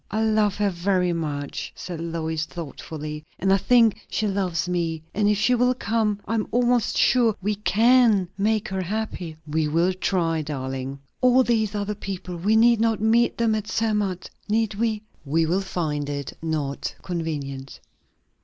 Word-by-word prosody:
"I 220 Hz, +2 st, 0 dB
love 215 Hz, -2 st, +2 dB
her 205 Hz, -1 st, +1 dB
very 180 Hz, 0 st, +1 dB
much," 145 Hz, -4 st, -4 dB
said 175 Hz, -3 st, -6 dB
Lois 160 Hz, -1 st, -2 dB
thoughtfully, 155 Hz, -2 st, -7 dB
"and 190 Hz, +1 st, +2 dB
I -, -, +5 dB
think 230 Hz, +1 st, +3 dB
she 220 Hz, -, -1 dB
loves 185 Hz, -4 st, -1 dB
me. 165 Hz, -3 st, -1 dB
And 205 Hz, 0 st, +2 dB
if 210 Hz, -, +2 dB
she 220 Hz, +5 st, +3 dB
will 250 Hz, +1 st, +3 dB
come 215 Hz, -3 st, 0 dB
I 225 Hz, -, -1 dB
am 220 Hz, -2 st, 0 dB
almost 245 Hz, -1 st, +2 dB
sure 235 Hz, -4 st, +4 dB
we 210 Hz, +3 st, 0 dB
can 215 Hz, -1 st, +4 dB
make 215 Hz, +2 st, +1 dB
her 190 Hz, 0 st, -2 dB
happy." 185 Hz, -4 st, -4 dB
"We 155 Hz, 0 st, 0 dB
will 170 Hz, +5 st, +2 dB
try, 170 Hz, -3 st, 0 dB
darling." 135 Hz, -2 st, -4 dB, 0.2 s
"And 255 Hz, 0 st, +5 dB
these 220 Hz, -3 st, +1 dB
other 205 Hz, 0 st, -2 dB
people 190 Hz, -3 st, -6 dB
we 200 Hz, +6 st, +1 dB
need 230 Hz, 0 st, +5 dB
not 225 Hz, -1 st, +2 dB
meet 225 Hz, +3 st, +3 dB
them 230 Hz, -1 st, +2 dB
at 215 Hz, -1 st, -2 dB
Zermatt, 210 Hz, -5 st, -1 dB, 0.2 s
need 220 Hz, 0 st, +1 dB
we?" 215 Hz, 0 st, -1 dB, 0.2 s
"We 160 Hz, +3 st, +1 dB
will 180 Hz, +5 st, +1 dB
find 155 Hz, -6 st, -2 dB
it 140 Hz, -1 st, -4 dB
not 150 Hz, -3 st, -3 dB
convenient." 145 Hz, -6 st, -4 dB
195 Hz, 165 wpm, -24 LUFS, 160-220 Hz, 0.2 s, I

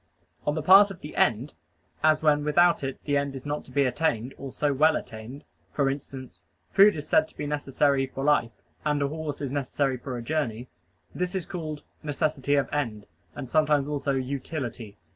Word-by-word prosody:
On 150 Hz, -, +1 dB
the 155 Hz, -, -2 dB
part 195 Hz, +5 st, +8 dB
of 195 Hz, -3 st, -10 dB
the 150 Hz, -, -9 dB
end, 120 Hz, +5 st, +1 dB, 0.5 s
as 155 Hz, 0 st, +4 dB
when 150 Hz, -1 st, +3 dB
without 170 Hz, +2 st, +3 dB
it 135 Hz, -1 st, -4 dB
the 145 Hz, -1 st, +1 dB
end 140 Hz, -1 st, -2 dB
is 130 Hz, -, -8 dB
not 145 Hz, +1 st, -3 dB
to -, -, -15 dB
be 140 Hz, -, +2 dB
attained 125 Hz, -2 st, 0 dB
or 135 Hz, -1 st, -8 dB
so 145 Hz, +1 st, 0 dB
well 155 Hz, +3 st, +4 dB
attained: 115 Hz, +6 st, -7 dB, 0.3 s
for 140 Hz, -2 st, +1 dB
instance, 135 Hz, -2 st, -8 dB, 0.3 s
food 205 Hz, +1 st, +6 dB
is 150 Hz, -1 st, -6 dB
said -, -, +3 dB
to -, -, -19 dB
be -, -, -3 dB
necessary 140 Hz, -1 st, +1 dB
for 135 Hz, +1 st, -6 dB
life, 125 Hz, -7 st, +1 dB, 0.2 s
and 150 Hz, -1 st, +1 dB
a -, -, +1 dB
horse 150 Hz, -1 st, -5 dB
is 140 Hz, -3 st, -3 dB
necessary 135 Hz, -1 st, -1 dB
for 125 Hz, 0 st, -6 dB
a 120 Hz, -, -6 dB
journey. 125 Hz, -4 st, -2 dB, 0.4 s
This 180 Hz, +1 st, -3 dB
is 185 Hz, -3 st, -2 dB
called 160 Hz, -5 st, -6 dB, 0.2 s
"necessity 145 Hz, -2 st, 0 dB
of 140 Hz, -, +2 dB
end," 115 Hz, -8 st, -2 dB, 0.3 s
and 130 Hz, -, -6 dB
sometimes 150 Hz, 0 st, +2 dB
also 140 Hz, -1 st, -1 dB
"utility." 130 Hz, -5 st, -4 dB
145 Hz, 195 wpm, -26 LUFS, 130-155 Hz, 0.5 s, part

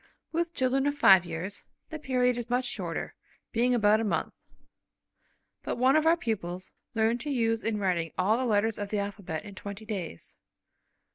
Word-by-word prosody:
With 340 Hz, +1 st, -1 dB
children 265 Hz, +1 st, +1 dB
of 285 Hz, -, 0 dB
five 190 Hz, -8 st, +7 dB
years, 175 Hz, +4 st, -5 dB, 0.3 s
the 315 Hz, -, -5 dB
period 250 Hz, -3 st, +1 dB
is 240 Hz, -1 st, -5 dB
much 250 Hz, +1 st, +1 dB
shorter, 245 Hz, -, -4 dB, 0.4 s
being 245 Hz, +2 st, +2 dB
about 215 Hz, -1 st, +4 dB
a -, -, 0 dB
month. 210 Hz, -, -1 dB, 1.3 s
But -, -, -3 dB
one 260 Hz, +3 st, +4 dB
of 310 Hz, +1 st, +3 dB
our 335 Hz, +1 st, +5 dB
pupils 185 Hz, -, -4 dB, 0.2 s
learned 225 Hz, +2 st, +2 dB
to 295 Hz, -, -5 dB
use 225 Hz, -4 st, +1 dB
in 220 Hz, -1 st, 0 dB
writing 175 Hz, -5 st, 0 dB
all 195 Hz, +4 st, +3 dB
the 255 Hz, +2 st, -1 dB
letters 215 Hz, 0 st, +1 dB
of 205 Hz, -1 st, -4 dB
the 210 Hz, -, -1 dB
alphabet 200 Hz, -4 st, -4 dB
in 205 Hz, -, -9 dB
twenty 200 Hz, +2 st, -8 dB
days. 190 Hz, -, -6 dB
220 Hz, 180 wpm, -28 LUFS, 200-250 Hz, 1.3 s, five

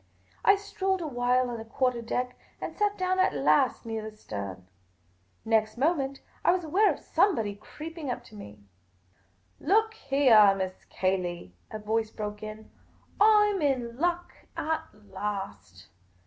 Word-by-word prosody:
I 400 Hz, -, +7 dB
strolled 385 Hz, -2 st, -2 dB
a 325 Hz, -, -3 dB
while 250 Hz, -1 st, +1 dB
on 235 Hz, -, -5 dB
the -, -, -6 dB
quarter 245 Hz, +1 st, 0 dB
deck, 250 Hz, +2 st, -2 dB, 0.2 s
and -, -, -5 dB
sat 415 Hz, -1 st, +1 dB
down 370 Hz, 0 st, 0 dB
at 370 Hz, -, +3 dB
last 150 Hz, -, +2 dB
near 225 Hz, -1 st, -3 dB
the 215 Hz, 0 st, -9 dB
stern. 95 Hz, -, -7 dB, 0.8 s
Next 220 Hz, 0 st, +1 dB
moment, 275 Hz, -1 st, 0 dB, 0.2 s
I -, -, +3 dB
was 365 Hz, -1 st, -1 dB
aware 385 Hz, +7 st, +3 dB
of -, -, -4 dB
somebody 225 Hz, -, +1 dB
creeping 305 Hz, +8 st, -8 dB
up 245 Hz, -, -3 dB
to 215 Hz, -, -15 dB
me. 105 Hz, -, -11 dB, 0.5 s
" 95 Hz, 0 st, -39 dB
Look 440 Hz, +1 st, +3 dB
heah. 260 Hz, -, +5 dB
Miss 185 Hz, -1 st, -4 dB
Cayley," 180 Hz, -, -2 dB, 0.2 s
a -, -, -5 dB
voice 220 Hz, +1 st, -1 dB
broke 210 Hz, -1 st, -6 dB
in; 215 Hz, 0 st, -8 dB, 0.5 s
"I 420 Hz, 0 st, +6 dB
'm 385 Hz, -, -2 dB
in 250 Hz, -5 st, 0 dB
luck 350 Hz, +1 st, 0 dB, 0.2 s
at 320 Hz, 0 st, -1 dB, 0.2 s
last 105 Hz, -, -6 dB
235 Hz, 155 wpm, -28 LUFS, 205-325 Hz, 0.8 s, I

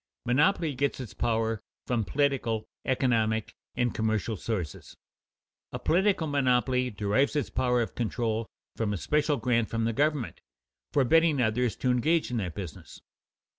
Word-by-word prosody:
Monopoly 150 Hz, +4 st, +2 dB
gets 140 Hz, +2 st, -1 dB
its 125 Hz, -4 st, -7 dB
power 115 Hz, -2 st, 0 dB, 0.2 s
from 120 Hz, -3 st, 0 dB
political, 130 Hz, -3 st, 0 dB, 0.2 s
economic, 115 Hz, -4 st, +1 dB, 0.2 s
and 120 Hz, -1 st, +1 dB
commercial 110 Hz, 0 st, 0 dB
sources. 95 Hz, -7 st, -5 dB, 0.7 s
A -, -, -3 dB
political 185 Hz, 0 st, +2 dB
monopoly 125 Hz, -3 st, +2 dB
derives 105 Hz, +7 st, +1 dB
its 145 Hz, -, -1 dB
power 125 Hz, -2 st, +2 dB
of 110 Hz, -, -7 dB
control 115 Hz, -1 st, -1 dB, 0.3 s
from 110 Hz, -2 st, -1 dB
a -, -, -2 dB
special 150 Hz, -, +1 dB
grant 120 Hz, -4 st, +1 dB
from 115 Hz, -1 st, -1 dB
the 115 Hz, -, 0 dB
government, 145 Hz, -1 st, 0 dB, 0.5 s
forbidding 150 Hz, +2 st, +4 dB
others 120 Hz, 0 st, +1 dB
to 130 Hz, -, 0 dB
engage 155 Hz, +5 st, +2 dB
in 125 Hz, -, -1 dB
that 90 Hz, -6 st, -3 dB
business. 90 Hz, -7 st, -8 dB
125 Hz, 140 wpm, -28 LUFS, 110-140 Hz, 0.7 s, forbidding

